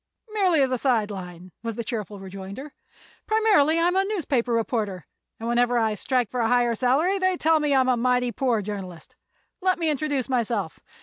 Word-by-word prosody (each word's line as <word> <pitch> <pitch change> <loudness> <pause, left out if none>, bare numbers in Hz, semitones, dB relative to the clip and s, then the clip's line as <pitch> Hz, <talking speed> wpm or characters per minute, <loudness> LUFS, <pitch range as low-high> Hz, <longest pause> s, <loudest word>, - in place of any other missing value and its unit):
"Merely 370 -8 +3
as 260 - 0
a 255 - 0
side 225 -6 +1
line," 180 -2 -8
was 230 -2 -4
the 235 - -4
cheerful 210 -3 -5
rejoinder. 195 +8 -8 0.5
"Primarily 410 -8 +3
I'm 350 +2 +2
a 385 - +3
newspaper 300 - -1
reporter, 220 -6 -1 0.3
and 225 - -5
whenever 240 +1 +2
I 220 -2 +1
strike 245 +1 -1
for 250 - -3
a 230 - +2
higher 240 0 +2
salary 280 - +1
they 370 -1 +1
tell 320 0 +3
me 295 -2 +1
I'm 260 -1 +3
a 255 - +3
mighty 250 0 +1
poor 235 -2 0
journalist. 185 -5 -7 0.5
Let 370 0 +2
me 325 -2 0
introduce 285 -3 -1
myself. 230 -8 -1
245 Hz, 185 wpm, -24 LUFS, 215-300 Hz, 0.5 s, Merely